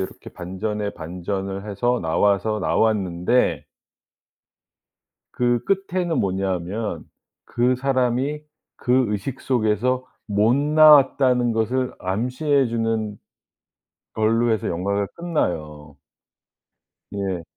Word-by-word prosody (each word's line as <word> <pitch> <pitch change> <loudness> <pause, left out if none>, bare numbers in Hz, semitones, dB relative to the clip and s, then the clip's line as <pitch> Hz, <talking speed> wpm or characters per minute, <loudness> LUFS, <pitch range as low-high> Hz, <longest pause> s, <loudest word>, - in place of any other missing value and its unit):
이렇게 95 - -7
반전에 100 +3 -4
반전을 95 +4 -5
해서 120 +5 0
나와서 100 +6 +1
나왔는데 105 +1 +1 1.7
그 120 -1 0
끝에는 185 -5 -1
뭐냐 95 0 0
하면 100 +5 -5 0.4
그 125 +2 +1
사람이 130 +2 0 0.3
그 125 0 +2
의식 105 +6 -4
속에서 125 +1 0 0.2
못 105 +3 +2
나왔다는 140 -4 +5
것을 125 +3 -1
암시해 125 +9 0
주는 115 -3 -2 1.0
걸로 115 +2 +2
해서 110 -3 -1
영화가 100 +4 -1
끝나요. 75 - -3 1.1
네. 95 -3 -3
110 Hz, 200 characters per minute, -22 LUFS, 95-130 Hz, 1.7 s, 나왔다는